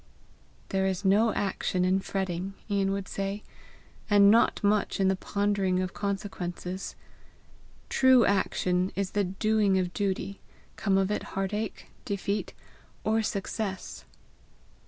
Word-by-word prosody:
"There 190 0 +1
is 190 +1 -2
no 210 +4 +4
action 185 -2 0
in 185 +1 +3
fretting," 190 0 -3
Ian 200 -2 +1
would 195 0 -3
say, 195 +1 -3 0.7
"and 205 -1 +7
not 230 -1 +3
much 205 0 +2
in 190 -1 +4
the 190 - +2
pondering 200 -1 0
of 185 -1 -2
consequences. 190 -2 -4 0.9
True 260 -3 +5
action 185 -2 +1
is 195 -1 -1
the 205 - +1
doing 205 +1 +2
of 180 -1 -1
duty, 200 0 -2 0.4
come 195 -2 +1
of 195 +1 +1
it 210 - -1 0.2
heartache, 205 +3 -3
defeat, 200 -2 -3 0.5
or 220 +1 +2
success." 200 -1 -4
195 Hz, 125 wpm, -28 LUFS, 190-205 Hz, 0.9 s, and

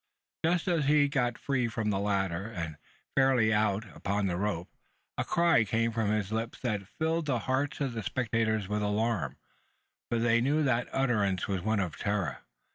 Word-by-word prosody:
Just 170 +2 +1
as 165 -5 +2
he 150 +1 +5
had 145 - 0
got 125 -4 +1
free 130 -4 0
from 110 -1 -1
the 95 - 0
ladder, 100 -2 0
and 80 -8 -5 0.4
fairly 130 -5 +4
out 105 0 +1
upon 100 +1 -1
the 90 -2 0
rope, 90 -2 -2 0.5
a - - 0
cry 170 -8 +3
came 115 +2 0
from 110 -2 0
his 105 -1 0
lips 115 +1 -3
that 105 -6 -2
thrilled 160 0 0
the 130 -4 +2
hearts 130 +2 0
of 135 -3 -1
the 115 - -3
spectators 110 -2 0
with 105 +1 -1
alarm: 105 -2 0 0.7
for 120 - +1
they 115 0 +3
knew 145 +5 +2
that 125 -3 +1
the - - -10
utterance 105 -9 +1
was 95 -3 -1
one 110 +2 +1
of 90 -5 -2
terror. 100 -4 -1
110 Hz, 190 wpm, -30 LUFS, 100-130 Hz, 0.7 s, he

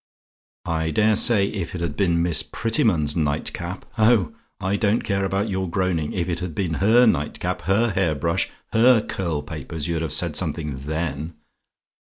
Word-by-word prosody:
I 80 -1 -1
dare 105 +7 +3
say 105 -2 +4
if 95 -5 -5
it 85 - -4
had 85 -4 -2
been 85 -3 +2
Miss 85 -2 +2
Prettyman's 95 -8 +1
night 75 -2 -1
cap 85 +2 -6
oh, 110 -6 +4 0.3
I 95 +2 -1
don't 105 +2 +1
care 100 -1 -1
about 95 +2 -1
your 95 -3 -2
groaning 85 -4 -1
if 90 -2 -2
it 85 -2 -2
had 90 -3 -5
been 90 -5 -1
her 115 +5 +6
night 75 -10 0
cap, - - -2
her 110 +4 +3
hair 95 -5 +1
brush 85 +3 0 0.2
her 115 0 +5
curl 85 -6 -3
papers, 75 0 -6
you'd 85 -2 -1
have 80 -4 -3
said - - 0
something 75 -5 -2
then. 80 0 -3
85 Hz, 180 wpm, -23 LUFS, 80-100 Hz, 0.3 s, her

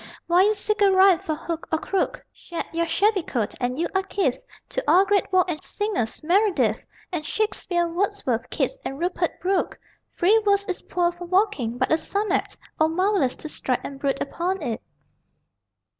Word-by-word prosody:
while 350 +2 +5
you 425 +2 +3
seek 420 +1 -1
a 400 - +6
rhyme 380 -2 +6
for 310 - -3
hook 330 +1 -5
or 315 - +3
crook 380 +4 -2 0.2
Vanished 340 -1 -5
your 335 0 0
shabby 400 +4 +2
coat, 235 -10 -2
and 250 +1 -1
you 335 - 0
are 385 - +2
kith 390 +1 -1 0.3
To - - -2
all 380 +2 +6
great 400 -1 +1
walk 370 -1 +4
and 325 -4 -3
singers 400 - -2
Meredith, 340 - +2 0.2
And 340 -4 -2
Shakespeare, 360 -3 -1
Wordsworth, 335 - -1
Keats, - - -1
and 270 - -4
Rupert 350 +1 -1
Brooke! 375 +1 0 0.4
Free 420 +6 +4
verse 400 -1 +2
is 370 - -3
poor 350 -1 0
for 350 0 -9
walking, 350 - +1
but 260 - 0
a 315 - +4
sonnet 400 +4 -1 0.2
O 315 - +5
marvellous 365 -5 +1
to - - -7
stride 255 -4 -1
and 275 -1 -7
brood 275 -1 0
upon 355 +4 -2
it! 235 -5 -3
355 Hz, 180 wpm, -24 LUFS, 310-400 Hz, 0.4 s, a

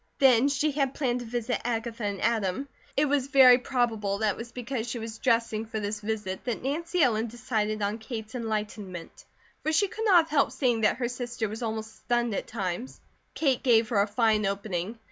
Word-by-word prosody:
Then 260 -1 +5
she 290 +2 +1
had 275 -2 -1
planned 250 -4 0
to 245 - -7
visit 240 +1 -2
Agatha 230 -1 -2
and 200 -1 -2
Adam. 225 +2 0 0.3
It 295 - +4
was 280 -2 +1
very 260 -3 +7
probable 225 -6 0
that 215 0 +1
it - - -6
was 235 +1 -7
because 245 -1 -4
she 240 - -3
was 225 -1 -6
dressing 230 -3 +1
for 220 0 -4
this 205 0 -3
visit 210 -3 -3
that 240 -2 -3
Nancy 330 +5 0
Ellen 225 -2 +2
decided 215 -3 -2
on 205 +3 -1
Kate's 220 -1 -7
enlightenment, 210 -6 -5 0.4
for 315 - 0
she 365 +6 +3
could 445 +4 -5
not 370 -5 +7
have 320 - -14
helped 290 -2 +2
seeing 245 -5 +1
that 215 - +3
her 245 -2 -1
sister 245 -2 -3
was 215 +3 -7
almost 220 -1 -4
stunned 240 -2 0
at - - -3
times. 200 +2 -4 0.4
Kate 270 -5 +1
gave 230 -3 +4
her 210 -5 +3
a 200 - +1
fine 215 0 +2
opening. 200 +1 -3
230 Hz, 200 wpm, -27 LUFS, 215-255 Hz, 0.4 s, very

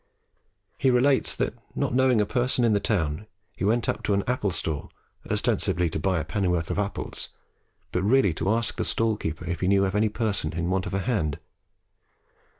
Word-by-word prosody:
He 135 - +3
relates 130 +2 +3
that, - - -1 0.2
not - - -1
knowing 130 -2 +4
a 105 - +3
person 125 +2 +1
in 110 - +3
the 100 - +3
town, 85 -2 -1 0.3
he - - -5
went 115 +4 +2
up - - -1
to 100 - +2
an 100 - +1
apple 125 -5 0
stall 80 -4 -3 0.4
ostensibly 85 -2 +1
to - - -2
buy 95 +2 +1
a 80 - -3
pennyworth 90 -1 0
of - - -1
apples, 100 0 -3 0.6
but 90 - 0
really 105 -2 +3
to 95 - -2
ask 115 +1 0
the - - 0
stall 115 -1 +1
keeper 80 -4 -5
if 85 -1 -3
he 90 - 0
knew 100 0 +4
of 95 - -2
any 105 +1 +2
person 105 -8 -1
in 85 +2 -1
want 95 +1 0
of 90 - -3
a 100 - 0
hand. 90 - -1
100 Hz, 200 wpm, -26 LUFS, 85-115 Hz, 0.6 s, knowing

